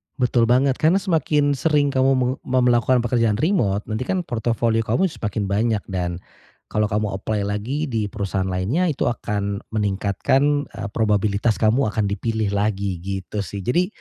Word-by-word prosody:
Betul 120 -2 +2
banget, 130 +3 +3
karena 160 +4 +4
semakin 160 -6 +1
sering 145 +1 +2
kamu 130 0 +3
meng 130 0 +1
mau 130 0 +2
melakukan 125 0 +3
pekerjaan 115 -3 +1
remote 115 - +1
nanti 110 +4 -4
kan 185 -1 0
portofolio 115 -3 0
kamu 115 - 0
semakin 105 -4 -3
banyak, 110 0 +1
dan 90 -2 -2 0.5
kalau 105 0 +1
kamu 105 0 -1
apply 105 +1 -2
lagi 120 +10 -2
di 110 -3 -1
perusahaan 95 -2 -2
lainnya 95 - 0
itu 145 - -2
akan 100 -3 -2 0.2
meningkatkan, 105 +8 +1
eee, 105 -2 -5
probabilitas 105 0 +1
kamu 110 +2 +2
akan 105 -2 0
dipilih 110 +1 -1
lagi 100 -2 -1
gitu 95 +2 -4
sih. 100 +2 -6
Jadi, 175 - +1
110 Hz, 160 wpm, -22 LUFS, 100-130 Hz, 0.5 s, karena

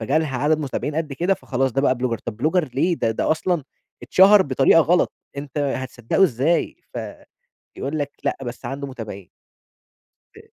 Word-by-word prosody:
فجالها 140 +3 0
عدد 150 +4 +2
متابعين 145 0 -3
قد 155 -2 -2
كده، 175 +7 +1
فخلاص 135 -5 -1
ده 135 - +1
بقى 135 -2 +3
بلوجر 125 -2 -2
طب 110 -3 -7
بلوجر 155 +5 +1
ليه؟ 170 +6 +2
ده 115 - 0
ده 110 - -1
أصلًا 160 -1 0 0.4
اتشهر 195 +2 +6
بطريقة 135 +2 +4
غلط، 175 +3 +2 0.2
أنت 140 +1 -5
هتصدقه 130 - -1
إزاي؟ 145 +3 +1 0.2
ف - - -3 0.8
يقول 145 +3 -3
لك 145 -1 -2
لأ، - - 0
بس 120 0 -7
عنده 135 +3 -4
متابعين. 110 -8 -8 1.1
ب - - -14
140 Hz, 165 wpm, -22 LUFS, 130-160 Hz, 1.1 s, اتشهر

